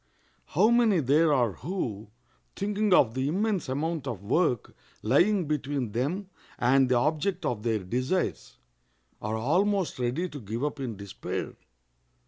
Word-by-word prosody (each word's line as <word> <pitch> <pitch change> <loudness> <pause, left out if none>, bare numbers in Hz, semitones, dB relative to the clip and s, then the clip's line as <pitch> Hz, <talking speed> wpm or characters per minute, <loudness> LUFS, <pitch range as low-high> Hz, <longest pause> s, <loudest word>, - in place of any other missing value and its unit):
How 205 +9 +3
many 230 -6 +4
there 150 +3 +3
are 125 -6 +3
who, 115 - -4 0.5
thinking 210 +1 0
of 125 -10 +5
the 130 +2 -1
immense 195 0 0
amount 150 +2 -2
of 110 -6 -5
work 125 - 0 0.3
lying 175 - +3
between 140 -5 -2
them 150 - -2 0.3
and 130 +1 +3
the 125 - +3
object 155 +7 0
of 120 -6 -1
their 115 -1 +1
desires, 130 - -2 0.6
are 110 +1 -2
almost 185 - +1
ready 125 +9 -1
to 145 -4 -8
give 110 +4 -4
up 150 0 -2
in 120 -6 -4
despair! 100 -1 -5
145 Hz, 140 wpm, -28 LUFS, 120-180 Hz, 0.6 s, of